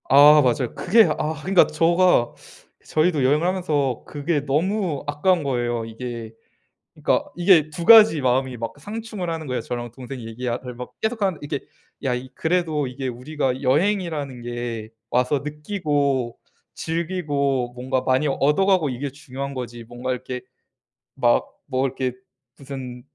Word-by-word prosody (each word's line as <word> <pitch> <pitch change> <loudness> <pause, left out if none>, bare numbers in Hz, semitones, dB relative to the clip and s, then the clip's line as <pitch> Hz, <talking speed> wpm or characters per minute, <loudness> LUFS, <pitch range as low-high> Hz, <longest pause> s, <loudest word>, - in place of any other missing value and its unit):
아 145 +3 +8
맞아요. 125 -1 +1
그게 220 +4 +5
아 155 +1 -1
그러니까 190 +2 +4
저가 170 -5 +3 0.5
저희도 155 -2 +1
여행을 150 +5 +3
하면서 150 -9 0
그게 145 +1 -1
너무 170 +2 0
아까운 155 +4 +2
거예요 120 -4 -1
이게. 115 0 -7 0.6
그러니까 - - 0
이게 175 -4 +5
2 170 +2 -5
가지 215 -7 +8
마음이 130 0 +1
막 115 0 -4
상충을 210 +1 -5
하는 160 -1 -4
거예요. 125 -2 -2
저랑 120 -1 -5
동생이 125 -1 -8
얘기알 120 +1 -3
를 125 -1 -6
막 125 +1 -8
계속하는데 210 -7 0
이게 145 -1 -3 0.4
"야 135 -3 0
이 125 +1 -5
그래도 160 -4 0
이게 130 +1 -5
우리가 130 +1 -2
여행이라는 150 -3 0
게 120 -2 -5 0.2
와서 125 +3 +2
느끼고 145 - -1 0.4
즐기고 145 -7 -1
뭔가 130 +1 -1
많이 130 +3 +2
얻어가고 155 +5 +2
이게 135 +3 -4
중요한 140 -1 -6
거지. 120 -2 -6
뭔가 120 +2 -4
이렇게 125 0 -5 0.8
막 - - +3 0.3
뭐 130 +1 +1
이렇게 130 -1 -1 0.5
무슨 130 -3 -7
140 Hz, 315 characters per minute, -23 LUFS, 125-165 Hz, 0.8 s, 아